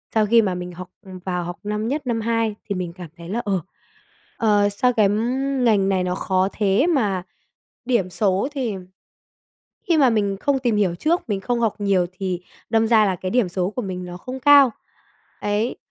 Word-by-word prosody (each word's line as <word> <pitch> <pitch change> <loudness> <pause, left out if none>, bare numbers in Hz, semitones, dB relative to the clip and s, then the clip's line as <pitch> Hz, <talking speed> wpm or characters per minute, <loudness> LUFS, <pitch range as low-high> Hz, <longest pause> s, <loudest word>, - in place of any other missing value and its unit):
sau 220 -1 +4
khi 230 +2 +5
mà 190 -4 -1
mình 180 0 -6
học 180 +1 -9
vào 185 -2 -5
học 175 +1 -6
năm 210 +1 -2
nhất, 280 +2 -3
năm 230 -2 0
hai 230 -1 0
thì 200 - -3
mình 180 -2 -4
cảm 175 -2 -10
thấy 170 0 -10
là, 230 +5 -1
ờ, 195 -3 0 0.8
ờ, 205 -2 +3
sao 250 +5 +1
cái 215 -4 +3
ngành 235 -2 +1
này 190 -2 +1
nó 180 0 -1
khó 190 0 +1
thế 205 - +2
mà 210 - +1 0.6
điểm 235 -7 +1
số 195 +4 +1
thì 255 -7 -2 1.1
khi 335 - +4
mà 270 -4 +5
mình 205 -3 0
không 280 -1 +1
tìm 240 -4 0
hiểu 195 -4 +1
trước, 315 - 0
mình 200 -3 -1
không 240 +4 -1
học 225 -3 +1
nhiều 195 -3 +2
thì 185 -1 -4 0.3
đâm 225 0 +2
ra 220 -2 +5
là 190 -2 0
cái 185 +1 -4
điểm 240 -4 +2
số 180 +1 -1
của 250 - -4
mình 185 -3 -5
nó 175 0 -7
không 255 +8 -7
cao, 280 -2 +7 0.7
ấy. 210 +4 -1
205 Hz, 200 wpm, -22 LUFS, 185-235 Hz, 1.1 s, cao